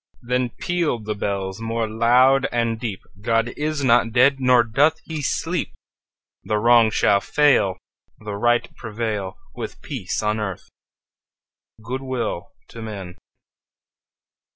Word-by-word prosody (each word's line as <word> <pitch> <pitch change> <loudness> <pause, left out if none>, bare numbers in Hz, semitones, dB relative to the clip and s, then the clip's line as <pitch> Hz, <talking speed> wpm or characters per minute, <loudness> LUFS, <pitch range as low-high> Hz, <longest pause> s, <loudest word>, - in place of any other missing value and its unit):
Then 125 +1 0
pealed 165 -11 -1
the 105 - -1
bells 100 0 -3
more 115 0 -1
loud 125 +5 +4
and 115 -1 0
deep: 110 -6 -4 0.2
"God 115 +2 +1
is 150 -1 -2
not 120 -2 +4
dead; 130 +4 +4
nor 125 -2 +5
doth 145 +8 +2
he 160 -2 -4
sleep! 165 +5 -2 0.7
The 105 - 0
Wrong 115 +1 +5
shall 100 -1 +3
fail, 135 -11 +3 0.4
The 105 -1 -7
Right 120 +4 +1
prevail, 105 -4 -4 0.2
With - - -7
peace - - -4
on 105 +1 0
earth, 95 -4 -5 1.2
good 130 +3 -4
will 120 -9 -3 0.2
to 115 - -10
men!" 100 -5 -7
115 Hz, 130 wpm, -22 LUFS, 105-130 Hz, 1.2 s, nor